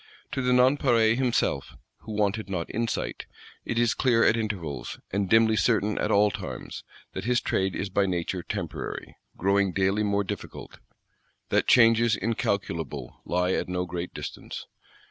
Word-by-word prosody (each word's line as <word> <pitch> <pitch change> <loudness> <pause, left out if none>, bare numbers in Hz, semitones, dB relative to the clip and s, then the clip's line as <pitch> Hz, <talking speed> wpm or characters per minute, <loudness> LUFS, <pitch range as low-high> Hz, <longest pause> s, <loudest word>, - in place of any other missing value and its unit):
To 135 - -2
the 125 0 +1
Nonpareil 125 -3 +4
himself, 120 - 0 0.2
who 110 - -8
wanted 105 0 0
not 90 -4 -3
insight, 115 0 -2 0.4
it 115 - -2
is 120 -1 +3
clear 120 -3 +3
at - - +5
intervals, 95 - -4
and 100 -1 -1
dimly 110 +1 +5
certain 110 -2 +1
at - - 0
all 105 +1 +4
times, - - -7 0.3
that 95 - -5
his 120 0 +3
trade 95 -5 -1
is 100 - -3
by 100 +1 +1
nature 90 0 -2
temporary, - - -5 0.2
growing 100 0 +2
daily 95 +3 +1
more 100 -1 +1
difficult; 95 - -7 0.7
that - - +2
changes 115 -1 +5
incalculable 85 - -3
lie 90 +1 +1
at - - -1
no 90 0 -1
great 90 0 -5
distance. - - -7
100 Hz, 150 wpm, -27 LUFS, 90-115 Hz, 0.7 s, at